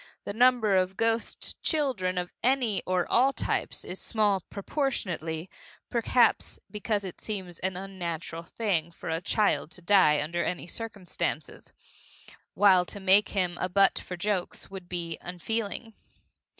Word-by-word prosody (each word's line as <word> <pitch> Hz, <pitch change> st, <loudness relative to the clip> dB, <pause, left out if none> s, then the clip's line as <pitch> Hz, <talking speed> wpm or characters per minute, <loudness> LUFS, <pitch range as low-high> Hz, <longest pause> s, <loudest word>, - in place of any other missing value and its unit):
The 200 Hz, -, -4 dB
number 240 Hz, -3 st, +4 dB
of 185 Hz, 0 st, +1 dB
ghost 225 Hz, 0 st, -1 dB
children 250 Hz, -, 0 dB
of 180 Hz, 0 st, -3 dB
any 245 Hz, -5 st, +3 dB
or 180 Hz, -1 st, +1 dB
all 265 Hz, +3 st, +4 dB
types -, -, -1 dB
is 185 Hz, -, -5 dB
small 210 Hz, -3 st, +2 dB
proportionately 185 Hz, -, -2 dB, 0.4 s
perhaps 240 Hz, 0 st, +2 dB
because 210 Hz, -1 st, -1 dB
it 185 Hz, -3 st, -7 dB
seems 190 Hz, -5 st, -5 dB
an 185 Hz, 0 st, -2 dB
unnatural 170 Hz, -4 st, -5 dB
thing 170 Hz, -3 st, -1 dB
for 165 Hz, -, -8 dB
a 160 Hz, +1 st, -1 dB
child 180 Hz, -6 st, +1 dB
to 180 Hz, -, -8 dB
die 170 Hz, -6 st, +5 dB
under 170 Hz, +4 st, -1 dB
any 180 Hz, -, -3 dB
circumstances, 205 Hz, -1 st, -4 dB, 0.8 s
while 190 Hz, -3 st, +6 dB
to 205 Hz, -, -7 dB
make 195 Hz, +2 st, +4 dB
of -, -, -10 dB
him 180 Hz, -2 st, 0 dB
a 185 Hz, -, 0 dB
butt 195 Hz, +1 st, +4 dB
for 180 Hz, -, -7 dB
jokes 195 Hz, 0 st, -2 dB
would 185 Hz, -2 st, -8 dB
be 170 Hz, -3 st, -3 dB
unfeeling. 220 Hz, +5 st, -4 dB
190 Hz, 145 wpm, -28 LUFS, 175-220 Hz, 0.8 s, while